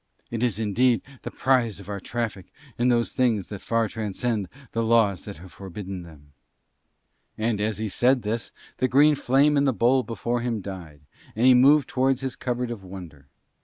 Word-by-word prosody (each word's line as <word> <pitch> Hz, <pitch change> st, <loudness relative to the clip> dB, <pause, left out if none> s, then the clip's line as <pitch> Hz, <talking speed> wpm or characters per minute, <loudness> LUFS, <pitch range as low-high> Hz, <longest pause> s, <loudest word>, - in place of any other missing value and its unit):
It 115 Hz, -1 st, -3 dB
is 120 Hz, -5 st, +1 dB
indeed 115 Hz, +3 st, +2 dB, 0.2 s
the -, -, -5 dB
prize 125 Hz, -6 st, +1 dB
of 100 Hz, -, -12 dB
our 100 Hz, -1 st, -4 dB
traffic 110 Hz, -3 st, -4 dB, 0.3 s
in 120 Hz, -, +2 dB
those 120 Hz, -1 st, +1 dB
things 115 Hz, -7 st, 0 dB
that 105 Hz, -2 st, -7 dB
far 115 Hz, -1 st, 0 dB
transcend 110 Hz, -1 st, -3 dB, 0.2 s
the 115 Hz, -, -1 dB
laws 110 Hz, -5 st, +2 dB
that 100 Hz, -, -8 dB
have 90 Hz, +3 st, -13 dB
forbidden 95 Hz, 0 st, -7 dB
them." 75 Hz, -4 st, -15 dB, 1.0 s
And 110 Hz, -1 st, -1 dB
as 105 Hz, 0 st, -1 dB
he 110 Hz, 0 st, -2 dB
said 125 Hz, +5 st, +2 dB
this 115 Hz, +2 st, -3 dB, 0.3 s
the 130 Hz, -, +1 dB
green 145 Hz, +4 st, +5 dB
flame 145 Hz, +2 st, +3 dB
in 140 Hz, -, +3 dB
the 135 Hz, -, +2 dB
bowl 125 Hz, +3 st, +3 dB
before 120 Hz, 0 st, -3 dB
him 120 Hz, -2 st, -2 dB
died, 90 Hz, -7 st, -9 dB, 0.3 s
and 115 Hz, +3 st, +1 dB
he 130 Hz, -, +8 dB
moved 140 Hz, +3 st, +5 dB
towards 130 Hz, 0 st, +1 dB
his 130 Hz, -1 st, -4 dB
cupboard 125 Hz, -1 st, -3 dB
of 110 Hz, -5 st, -7 dB
wonder. 90 Hz, -7 st, -11 dB
115 Hz, 185 wpm, -25 LUFS, 100-125 Hz, 1.0 s, he